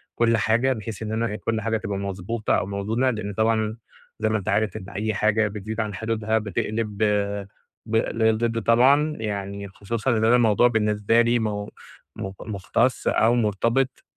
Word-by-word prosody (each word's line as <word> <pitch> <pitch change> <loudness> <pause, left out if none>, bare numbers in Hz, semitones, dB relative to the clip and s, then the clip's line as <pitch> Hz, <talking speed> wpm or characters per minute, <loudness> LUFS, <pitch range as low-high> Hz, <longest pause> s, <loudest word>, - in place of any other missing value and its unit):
كل 115 -1 +3
حاجة، 115 +4 +2
بحيث 110 -2 -7
إن 110 - -4
أنا 110 -1 -1
كل 110 0 -2
حاجة 110 0 0
تبقى 100 -2 -4
مضبوطة 100 +3 -2
أو - - -1
موزونة، 105 +6 0
لإن 105 -4 -3
طبعًا 110 +1 +1 0.4
زي 110 0 +1
ما 110 - +1
أنت 100 - -4
عارف 110 0 +1
إن 95 -2 -9
أي 110 +2 -2
حاجة 110 +2 +2
بتزيد 105 +2 -6
عن 105 -2 -3
حدودها 110 +2 -1
بتقلِب 105 +1 -3 0.9
ب 110 - -2
للضِد 115 +1 +1
طبعًا، 140 +6 +4
يعني 100 -2 -4
خصوصًا 110 +6 -2
إن 110 - +2
أنا 115 +2 +5
الموضوع 120 -1 +4
بالنسبه 105 0 +2
لي 120 +1 +2
م 110 - 0 0.7
م 95 - -5
مُختَص 110 +4 -1
أو 115 +2 +3
مُرتبط 115 +4 0
110 Hz, 165 wpm, -24 LUFS, 105-115 Hz, 0.9 s, أنا